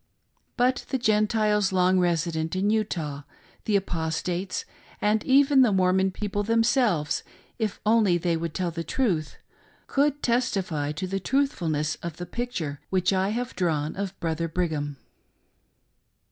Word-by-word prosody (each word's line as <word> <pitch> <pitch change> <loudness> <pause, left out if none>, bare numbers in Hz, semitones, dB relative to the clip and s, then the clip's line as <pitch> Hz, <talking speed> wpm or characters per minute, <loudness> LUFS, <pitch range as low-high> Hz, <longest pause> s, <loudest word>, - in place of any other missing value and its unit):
But 250 +1 +1
the 265 - 0
Gentiles 215 -3 +2
lopg 185 0 +3
resident 165 -1 0
in 200 +3 +1
Utah, 170 -10 -1 0.4
the 210 - +1
Apostates, 175 0 -2 0.3
an,d 210 +1 +1
even 275 +1 +5
the 245 -4 +5
Mormon 190 0 +3
people 205 +1 -3
themselves, 225 - +2 0.4
if 215 -3 -2
only 215 -5 +4
they 170 0 0
would 165 -1 -4
tell 180 -2 -1
the 165 0 -4
truth, 175 - -1 0.5
could 290 +1 +1
testify 195 - 0
to 185 +5 -4
the 195 +1 -2
truthfulness, 170 - 0
of 170 -2 -6
the 175 - -5
picture 175 - -4
which 185 0 +2
I 190 +1 +1
have 245 +3 -3
drawn 155 -4 -1
of 195 -1 -5
Brother 165 0 -1
Brigham. 155 -4 -2
190 Hz, 135 wpm, -26 LUFS, 165-220 Hz, 0.5 s, even